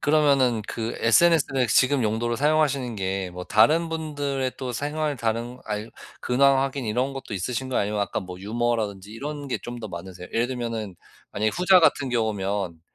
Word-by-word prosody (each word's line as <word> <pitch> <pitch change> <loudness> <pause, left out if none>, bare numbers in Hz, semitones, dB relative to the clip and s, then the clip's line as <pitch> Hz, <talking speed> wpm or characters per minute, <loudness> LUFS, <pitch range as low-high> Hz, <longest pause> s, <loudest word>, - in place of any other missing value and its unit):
그러면은 140 -7 +3
그 115 0 -4
SNS를 135 0 +4
지금 130 -1 +3
용도로 115 +2 0
사용하시는 140 -4 +1
게 95 -1 -2
뭐 90 0 -7
다른 155 - +4
분들의 145 -5 -2
또 130 -2 -4
생활, 150 +3 -2
다른 115 +1 -2
알 105 +1 -4 0.3
근황 135 +2 +4
확인 135 -1 -2
이런 125 +5 0
것도 135 -6 -6
있으신가요 125 +7 -2
아니면 105 +1 -1
아까 100 - -1
뭐 90 -1 -9
유머라든지 105 -2 -2
이런 145 +4 -6
게 - - -1
좀 120 0 -7
더 110 -2 -6
많으세요? 90 +1 -8
예를 115 +1 +1
들면은 115 -7 -4 0.4
만약에 110 +1 +1
후자 180 +1 +5
같은 145 -4 +3
경우면 100 -7 -1
120 Hz, 370 characters per minute, -25 LUFS, 105-140 Hz, 0.4 s, 후자